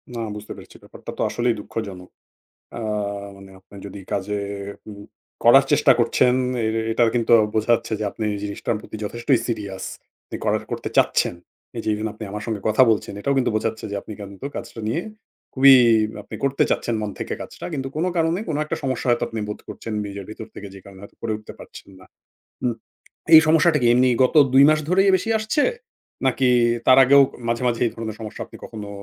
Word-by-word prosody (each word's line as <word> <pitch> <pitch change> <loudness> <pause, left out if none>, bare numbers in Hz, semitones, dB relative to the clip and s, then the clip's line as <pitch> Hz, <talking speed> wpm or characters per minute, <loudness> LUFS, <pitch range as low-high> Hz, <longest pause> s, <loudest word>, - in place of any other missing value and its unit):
না, - - -4 0.2
বুঝতে 105 0 -9
পেরেছি - - -14
ব্যাপারটা - - -10
তো - - -3
আসলেই 120 -1 0
দুঃখজনক। 100 -4 -7 0.6
অ্যা 120 - -6 0.5
মানে 95 0 -14
আপনি 100 +2 -17
যদি 100 0 -9
কাজে 100 +1 -2 0.2
এ 100 +1 -7
উম 100 -1 -10 0.4
করার - - +7
চেষ্টা - - +5
করছেন, 125 0 +3 0.3
এ - - +1
এ - - -1
এটার 115 0 +3
কিন্তু 120 -1 +1 0.2
বোঝা 110 +2 0
যাচ্ছে 115 -1 -4
যে 105 - -1
আপনি 110 - -5
এই 100 - -4
জিনিসটার 105 +2 -3
প্রতি 110 - -9
যথেষ্টই 120 +4 0
সিরিয়াস 100 -5 -4 0.5
যে - - -4
করার - - +1
করতে - - -4
চাচ্ছেন। - - +2 0.4
এই - - -3
যে - - -3
এই - - -1
জন্য 110 - -2
আপনি 110 +1 -8
আমার 105 +1 -5
সাথে 110 -3 -3
কথা 110 +5 +4
বলছেন 105 - -1
এটাও 140 +5 0
কিন্তু 125 - +1
বোঝাচ্ছে 110 0 -3
যে 100 - -3
আপনি 110 - -9
কিন্তু 100 +6 -8
কাজটা 115 - -7
নিয়ে 160 +10 -1 0.5
খুবই 135 0 +8 0.5
আপনি 100 - -11
করতে 140 0 +1
চাচ্ছেন 120 - 0
মন 105 - -3
থেকে - - -4
কাজটা। - - -10
কিন্তু 135 -1 -3
কোনো 175 +4 0
কারণে 165 +2 +1
কোনো 150 - -1
একটা 150 - -3
সমস্যা 130 -2 -2
হয়তো 120 0 +2
আপনি 115 -1 -6
বোধ 105 - -6
করছেন 115 - -7
নিজের 100 -1 -7
ভিতর 110 +1 -8
থেকে 100 - -8
যে 95 - -11
কারণে 100 -1 -14
হয়তো 100 - -13
করে 115 -1 -2
উঠতে 110 0 -11
পারছেন - - -13
না। 95 - -15 0.6
উম 120 -2 +1 0.6
এই 160 - +12
সমস্যাটা 160 0 +4
কি 120 - +3
এমনি 125 +1 +4
গত 130 - +1 0.2
২ 135 +1 +7
মাস 155 0 +3
ধরেই 195 +2 +4
বেশি 205 +5 -2
আসছে? 220 +8 0 0.6
নাকি 130 0 +2 0.4
তার 130 - +6
আগেও 140 +2 +7 0.3
মাঝে, 115 +1 -1
মাঝে 120 -1 -1
এই - - 0
ধরনের 110 -2 -5
সমস্যা 110 -1 -8
আপনি - - -14
কখনো 105 -2 -8
115 Hz, 205 wpm, -22 LUFS, 105-130 Hz, 0.6 s, এই